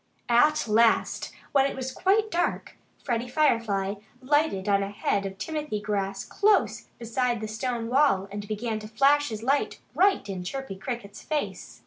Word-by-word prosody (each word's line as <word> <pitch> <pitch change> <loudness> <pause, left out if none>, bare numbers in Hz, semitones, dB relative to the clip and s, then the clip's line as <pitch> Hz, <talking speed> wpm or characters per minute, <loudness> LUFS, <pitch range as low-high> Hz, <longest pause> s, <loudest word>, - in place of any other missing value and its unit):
At 300 +4 +4
last, 225 +2 +2 0.2
when 275 -1 +4
it - - -5
was 260 0 -4
quite 400 +9 +1
dark, 350 +1 -1 0.3
Freddie 240 -2 -1
Firefly 230 -9 +1 0.3
lighted 275 -8 +1
on 200 -1 +3
a 195 - -2
head 200 -1 -1
of 195 0 -9
timothy 300 -1 -3
grass 195 -2 -2
close 410 -1 +2
beside 240 +1 -1
the 215 - -4
stone 230 +1 -3
wall 245 -7 +3
and 205 0 -6
began 215 +1 -2
to 215 - -8
flash 275 +6 +3
his 220 -1 -6
light 275 +4 0
right 390 - +3
in 190 -2 -5
Chirpy 270 +2 -5
Cricket's 220 -2 -6
face. 305 -1 -4
235 Hz, 160 wpm, -26 LUFS, 205-285 Hz, 0.3 s, At